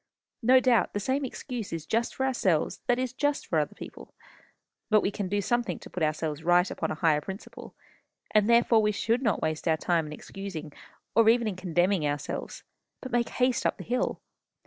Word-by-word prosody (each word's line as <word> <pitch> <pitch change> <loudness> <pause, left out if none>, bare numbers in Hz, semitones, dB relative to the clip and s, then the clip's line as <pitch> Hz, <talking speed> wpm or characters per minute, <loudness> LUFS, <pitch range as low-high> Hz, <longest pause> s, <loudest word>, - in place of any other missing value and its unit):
No 255 +2 +6
doubt 250 -4 +2
the 205 - -1
same 265 +7 -1
excuse 245 -4 -5
is 165 -1 -4
just 230 +5 -1
for 265 - 0
ourselves 190 -12 0
that 245 - +3
is 255 -1 -2
just 290 +2 0
for - - +1
other - - -2
people. - - -11 0.7
But 215 -1 +5
we 195 - 0
can 200 -2 -3
do 205 +1 0
something 235 -4 0
to - - -13
put 180 - -5
ourselves 155 0 -1
right 175 +2 +3
upon - - -3
a - - -2
higher 155 -2 +2
principle, 190 +6 -9 0.6
and 215 0 +3
therefore 235 -1 +5
we 210 0 +1
should 230 +4 0
not 225 -5 0
waste 155 +1 -2
our 160 -1 +3
time 165 -1 0
in - - -8
excusing, 160 -2 -7 0.4
or 225 0 +5
even 235 0 +3
in 205 - -2
condemning 180 -2 +1
ourselves, 145 -1 -4 0.4
but 260 - -8
make 240 -1 +1
haste 250 0 +1
up - - 0
the - - -8
hill. 250 +2 -1
205 Hz, 200 wpm, -28 LUFS, 165-240 Hz, 0.7 s, No